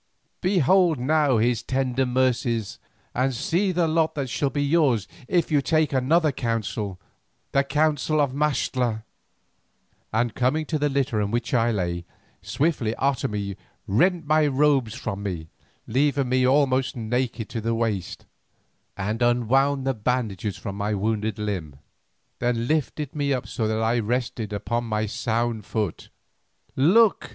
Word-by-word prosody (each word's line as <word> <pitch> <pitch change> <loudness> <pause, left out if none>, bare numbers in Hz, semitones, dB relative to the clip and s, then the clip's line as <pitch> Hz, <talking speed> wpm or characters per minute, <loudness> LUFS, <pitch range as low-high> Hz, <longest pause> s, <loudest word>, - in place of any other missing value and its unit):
Behold 180 -2 +3
now 145 0 +2
his 115 +1 +1
tender 130 -1 0
mercies, 125 -4 0 0.3
and 130 +1 0
see 180 - 0
the 175 -2 +1
lot 160 0 +1
that 135 -4 -3
shall 140 - 0
be 145 +1 -1
yours 140 - +2 0.2
if 170 -3 +1
you 145 -2 +4
take 155 0 +1
another 150 +5 +3
counsel, 110 -5 -3 0.5
the 140 - +3
counsel 150 +1 +1
of 140 -3 +2
Maxtla;" 130 -6 0 1.1
and 115 +1 0
coming 130 +5 +1
to 155 0 -2
the 145 0 +1
litter 135 -5 0
on 100 - -1
which 115 +1 -2
I 120 -1 +3
lay, 85 -5 -2 0.4
swiftly 135 -8 0
Otomie 105 -8 -1 0.3
rent 170 - +2
my 155 0 +3
robes 135 -4 +2
from 100 -5 -4
me 85 -6 -4 0.4
leaving 140 +2 +1
me 130 0 +3
almost 130 -1 +2
naked 115 -1 -2
to 115 -1 -4
the 115 +1 0
waist, 110 -6 -2 0.7
and 105 +4 -2
unwound 130 +3 +2
the 135 - +1
bandages 110 -4 -2
from 100 0 -6
my 105 +1 -1
wounded 110 +1 -1
limb, 95 -9 -4 0.6
then 120 -1 0
lifted 150 -1 -1
me 140 -1 0
up 125 - -2
so 110 - -2
that 110 +1 0
I 115 +2 +2
rested 115 -1 -2
upon 115 +3 -2
my 110 -1 -1
sound 115 +1 -1
foot. 105 -3 -3 0.7
"Look!" 195 +11 +4
125 Hz, 145 wpm, -24 LUFS, 110-145 Hz, 1.1 s, you